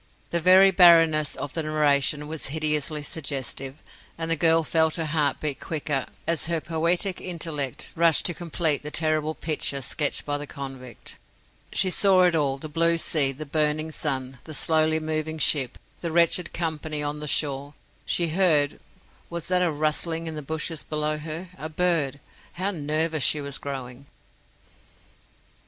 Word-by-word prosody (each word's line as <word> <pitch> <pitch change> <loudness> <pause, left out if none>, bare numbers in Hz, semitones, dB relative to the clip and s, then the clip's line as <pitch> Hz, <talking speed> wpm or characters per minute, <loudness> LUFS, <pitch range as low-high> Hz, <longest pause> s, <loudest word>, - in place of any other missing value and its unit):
The 170 - 0
very 185 +3 +6
barrenness 165 -5 +5
of 145 - -6
the 165 - -1
narration 150 -1 +1
was 160 0 -4
hideously 150 0 -1
suggestive, 135 -3 -4 0.4
and 165 0 -3
the - - +4
girl 165 +1 +4
felt 160 0 +1
her 165 - -2
heart 150 -3 0
beat 150 -3 -3
quicker 150 -4 -3 0.2
as 165 -1 0
her 165 -1 0
poetic 170 +4 0
intellect 155 -7 -3
rushed 165 -1 +3
to 175 - +2
complete 165 -3 0
the 150 - -6
terrible 155 0 0
picture 150 -3 -2
sketched 145 +3 -1
by 145 0 -2
the 145 - -6
convict. 135 -4 -9 0.5
She 190 -1 +2
saw 190 -1 +4
it 180 -1 +4
all 140 -4 +1
the 155 - -8
blue 165 +2 +1
sea, 150 -4 +1
the 150 +3 -8
burning 155 +1 +1
sun, 130 -4 -3
the 155 - -7
slowly 160 +1 +2
moving 155 0 -3
ship, 140 -5 +2 0.2
the 170 - -3
wretched 170 +1 +2
company 155 -2 -2
on 145 +1 -3
the 150 - -5
shore; 140 0 -1 0.3
she 170 -1 0
heard 155 -5 +3 0.5
Was 170 0 -5
that 180 0 +3
a 180 - +2
rustling 155 +2 0
in 160 - -4
the 155 - -5
bushes 160 +2 -3
below 150 0 -2
her? 160 +4 -6
A 155 - -5
bird! 155 -4 0 0.3
How 190 +3 -2
nervous 155 -1 0
she 150 +5 +3
was 140 -1 -4
growing! 135 -1 -7
155 Hz, 160 wpm, -25 LUFS, 145-165 Hz, 0.5 s, very